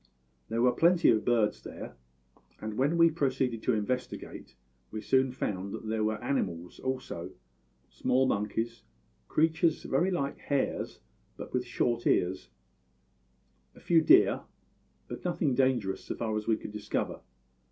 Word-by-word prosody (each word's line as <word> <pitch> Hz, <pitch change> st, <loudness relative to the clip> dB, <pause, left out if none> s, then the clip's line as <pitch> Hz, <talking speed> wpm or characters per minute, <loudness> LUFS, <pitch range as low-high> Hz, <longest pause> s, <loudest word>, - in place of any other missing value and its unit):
"There 115 Hz, +1 st, 0 dB
were 125 Hz, -, +5 dB
plenty 170 Hz, +7 st, +4 dB
of 110 Hz, -1 st, +2 dB
birds 115 Hz, -3 st, +2 dB
there; -, -, -8 dB, 0.7 s
and 110 Hz, 0 st, -5 dB
when 140 Hz, +8 st, +1 dB
we 165 Hz, -1 st, +6 dB
proceeded 130 Hz, -6 st, 0 dB
to 125 Hz, -, +1 dB
investigate 125 Hz, +5 st, -4 dB, 0.3 s
we 110 Hz, -, -5 dB
soon 130 Hz, +4 st, +2 dB
found 100 Hz, -6 st, -3 dB
that 110 Hz, -, -8 dB
there 110 Hz, 0 st, 0 dB
were 110 Hz, 0 st, 0 dB
animals 90 Hz, -10 st, -2 dB
also 130 Hz, 0 st, -4 dB, 0.5 s
small 130 Hz, +1 st, +1 dB
monkeys, 115 Hz, +1 st, -1 dB, 0.5 s
creatures 160 Hz, +1 st, +2 dB
very 180 Hz, -, +1 dB
like 140 Hz, -7 st, -2 dB
hares 140 Hz, -2 st, -2 dB, 0.4 s
but -, -, -8 dB
with 125 Hz, -1 st, -1 dB
short 120 Hz, -1 st, 0 dB
ears, 95 Hz, +1 st, +1 dB, 1.3 s
a -, -, -14 dB
few 165 Hz, -2 st, +4 dB
deer; 350 Hz, -, +5 dB, 0.7 s
but -, -, -7 dB
nothing 170 Hz, -6 st, 0 dB
dangerous 125 Hz, -7 st, +1 dB
so -, -, -4 dB
far 110 Hz, -2 st, -2 dB
as 105 Hz, 0 st, -3 dB
we 110 Hz, -1 st, +3 dB
could -, -, -8 dB
discover. 105 Hz, 0 st, -3 dB
125 Hz, 140 wpm, -30 LUFS, 110-140 Hz, 1.3 s, we